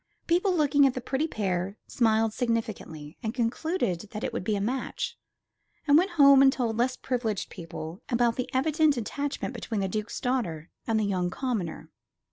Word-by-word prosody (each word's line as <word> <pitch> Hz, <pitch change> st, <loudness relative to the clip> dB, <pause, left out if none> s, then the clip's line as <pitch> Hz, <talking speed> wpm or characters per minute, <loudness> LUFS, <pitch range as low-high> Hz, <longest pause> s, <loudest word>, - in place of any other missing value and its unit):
People, 360 Hz, +3 st, +2 dB
looking 285 Hz, -3 st, +4 dB
at 260 Hz, -, -1 dB
the -, -, -2 dB
pretty 265 Hz, +5 st, -1 dB
pair, 195 Hz, -, -2 dB
smiled 225 Hz, -2 st, +2 dB
significantly, 220 Hz, -, -3 dB
and 220 Hz, +2 st, -3 dB
concluded 240 Hz, -, 0 dB
that 215 Hz, -1 st, -6 dB
it -, -, -2 dB
would -, -, -3 dB
be 210 Hz, +2 st, 0 dB
a -, -, -1 dB
match, 245 Hz, +6 st, -2 dB, 0.7 s
and 285 Hz, -2 st, +5 dB
went 360 Hz, +5 st, +5 dB
home 280 Hz, -2 st, +8 dB
and 270 Hz, 0 st, +7 dB
told 235 Hz, -4 st, -1 dB
less 255 Hz, +2 st, +1 dB
privileged 235 Hz, -6 st, -2 dB
people 165 Hz, +1 st, -7 dB
about 235 Hz, -2 st, +2 dB
the 255 Hz, 0 st, -3 dB
evident 295 Hz, +2 st, +2 dB
attachment 280 Hz, +5 st, -3 dB
between 225 Hz, -3 st, -3 dB
the 195 Hz, -, 0 dB
Duke's 215 Hz, +3 st, -3 dB
daughter 180 Hz, -12 st, -2 dB, 0.2 s
and 225 Hz, -1 st, +2 dB
the -, -, +1 dB
young 185 Hz, -3 st, 0 dB
commoner. 215 Hz, -7 st, -3 dB
235 Hz, 175 wpm, -27 LUFS, 200-270 Hz, 0.7 s, home